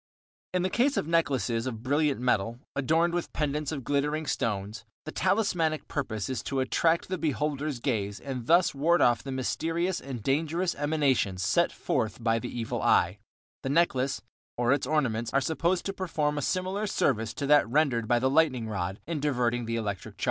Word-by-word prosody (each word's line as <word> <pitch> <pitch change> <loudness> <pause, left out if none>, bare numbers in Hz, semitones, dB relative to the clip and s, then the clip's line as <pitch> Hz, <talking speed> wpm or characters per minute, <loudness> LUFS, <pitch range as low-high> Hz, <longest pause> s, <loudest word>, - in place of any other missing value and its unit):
In 180 -1 0
the 185 - 0
case 270 +6 +2
of - - 0
necklaces 130 -8 +1
of 115 -3 -5
brilliant 145 +1 +1
metal, 115 -2 0 0.2
adorned 160 +5 +2
with 175 -1 -2
pendants 150 0 -1
of 140 -4 -4
glittering 145 +4 0
stones, 105 -5 -2 0.2
the 155 - -5
talismanic 180 -6 +1
purpose 110 -8 -3
is 130 -4 -3
to 135 - -2
attract 165 +7 +1
the 185 -1 -3
beholder's 150 -2 -1
gaze 105 -6 -2
and 130 -4 -6
thus 170 +2 +4
ward 165 +5 +3
off 120 -1 +4
the 135 - -6
mysterious 165 +7 -1
and 130 -5 -6
dangerous 165 - 0
emanations 140 -11 +1
set 170 - +2
forth 115 -3 -2
by 115 0 +2
the 120 - -5
Evil 115 -2 -3
Eye; 90 +5 +3 0.4
the 135 - -3
necklace, 140 -4 +1 0.3
or 120 +2 +3
its 140 -2 -1
ornaments, 120 -7 0
are - - +6
supposed 170 +5 0
to 195 - -2
perform 155 -6 -1
a - - -3
similar 185 +6 -1
service 115 - +1
to 140 - -3
that 145 -4 +5
rendered 130 -5 +2
by 120 - +3
the 130 +2 +2
lightning 135 -5 +2
rod 95 -2 -3
in 160 -1 -3
diverting 120 -4 0
the 115 0 -2
electric 105 -5 -4
discharge. - - -26
140 Hz, 185 wpm, -28 LUFS, 120-160 Hz, 0.4 s, are